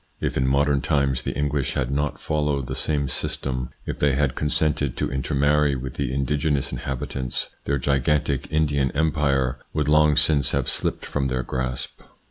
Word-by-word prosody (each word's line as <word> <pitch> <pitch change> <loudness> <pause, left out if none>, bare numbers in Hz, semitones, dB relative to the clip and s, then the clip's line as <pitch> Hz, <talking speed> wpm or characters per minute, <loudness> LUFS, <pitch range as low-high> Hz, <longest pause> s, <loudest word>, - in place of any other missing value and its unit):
If - - -2
in 65 0 +1
modern 70 +1 +2
times 70 -4 +1
the - - -4
English 70 -2 0
had 65 0 -1
not 75 +1 -1
followed 75 -3 0
the - - -4
same 75 -2 0
system, 65 0 -3 0.2
if - - -4
they 70 -2 +3
had 70 -2 +1
consented 75 -2 0
to - - -1
intermarry 70 +2 +2
with 65 0 -5
the 70 -3 -2
indigenous 70 +1 0
inhabitants, 65 -1 -3 0.2
their 70 - +1
gigantic 70 +1 +1
Indian 75 -3 +2
Empire 70 -4 +1 0.2
would 75 -2 +1
long 75 0 +5
since 70 -4 +3
have - - 0
slipped - - 0
from 70 -2 -1
their 65 -1 -1
grasp. 65 0 -4
70 Hz, 165 wpm, -24 LUFS, 65-75 Hz, 0.2 s, long